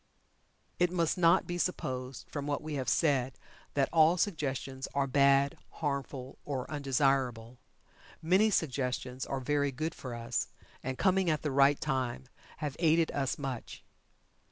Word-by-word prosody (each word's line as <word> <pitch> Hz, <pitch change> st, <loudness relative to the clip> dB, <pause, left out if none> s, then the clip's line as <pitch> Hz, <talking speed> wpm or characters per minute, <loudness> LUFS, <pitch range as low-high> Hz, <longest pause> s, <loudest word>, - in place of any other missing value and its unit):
It 175 Hz, 0 st, +3 dB
must 170 Hz, -3 st, +1 dB
not 170 Hz, -2 st, +4 dB
be 175 Hz, 0 st, -4 dB
supposed 130 Hz, -8 st, -3 dB
from 145 Hz, -1 st, -5 dB
what 145 Hz, -1 st, -2 dB
we 155 Hz, 0 st, -5 dB
have 130 Hz, -4 st, -1 dB
said 135 Hz, -5 st, +1 dB, 0.4 s
that 140 Hz, -1 st, +3 dB
all 165 Hz, +2 st, +5 dB
suggestions 135 Hz, -7 st, -2 dB
are 140 Hz, -1 st, +2 dB
"bad," 140 Hz, +1 st, +3 dB, 0.2 s
harmful, 140 Hz, -3 st, -4 dB
or 135 Hz, -3 st, -3 dB
undesirable. 135 Hz, -4 st, 0 dB, 0.6 s
Many 185 Hz, +7 st, +4 dB
suggestions 130 Hz, -6 st, -1 dB
are 135 Hz, -, -2 dB
very 145 Hz, +2 st, 0 dB
good 155 Hz, +6 st, -3 dB
for 125 Hz, -3 st, -7 dB
us, 120 Hz, +1 st, -2 dB, 0.3 s
and 130 Hz, 0 st, -4 dB
coming 190 Hz, -2 st, +3 dB
at 155 Hz, -1 st, 0 dB
the 150 Hz, -, -1 dB
right 140 Hz, +1 st, +4 dB
time 130 Hz, -4 st, -2 dB, 0.3 s
have 150 Hz, -3 st, -4 dB
aided 165 Hz, -1 st, +3 dB
us 135 Hz, -2 st, -1 dB
much. 135 Hz, -4 st, -6 dB
140 Hz, 145 wpm, -31 LUFS, 130-155 Hz, 0.6 s, all